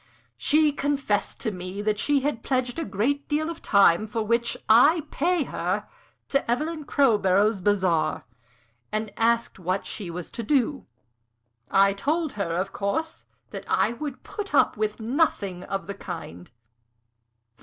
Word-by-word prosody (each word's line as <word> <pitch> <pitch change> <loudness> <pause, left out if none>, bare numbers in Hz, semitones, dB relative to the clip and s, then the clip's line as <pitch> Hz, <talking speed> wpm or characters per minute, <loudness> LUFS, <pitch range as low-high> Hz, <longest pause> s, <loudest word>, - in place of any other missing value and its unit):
"She 305 0 +3
confessed 280 -7 -1
to 220 - -1
me 185 +1 -6
that 210 0 0
she 285 +2 +2
had 275 -4 -2
pledged 255 +1 -1
a 325 - -2
great 275 +8 -1
deal 310 +2 0
of 335 - -8
the - - -19
time 200 0 +5
for 225 +1 -2
which 235 +2 0
I 290 +9 +6
pay 345 +1 +1
her - - -2 0.4
to 275 -3 0
Evelyn 305 +5 -1
Crowborough's 210 -7 +3
bazaar, 180 -6 +1 0.7
and 215 -1 -2
asked 230 -2 +1
what 185 +2 -2
she 195 -5 -5
was 170 0 -6
to - - -5
do. 270 +3 0 0.8
I 195 0 +4
told 305 +9 -1
her, 185 -5 -2
of 190 +2 -2
course, 320 +12 -3 0.3
that - - -6
I - - +2
would 275 +2 -6
put 415 -2 -5
up - - +4
with 215 +1 -2
nothing 220 - 0
of 195 -3 -3
the 200 - -5
kind." 90 - -8
225 Hz, 155 wpm, -25 LUFS, 195-285 Hz, 0.8 s, I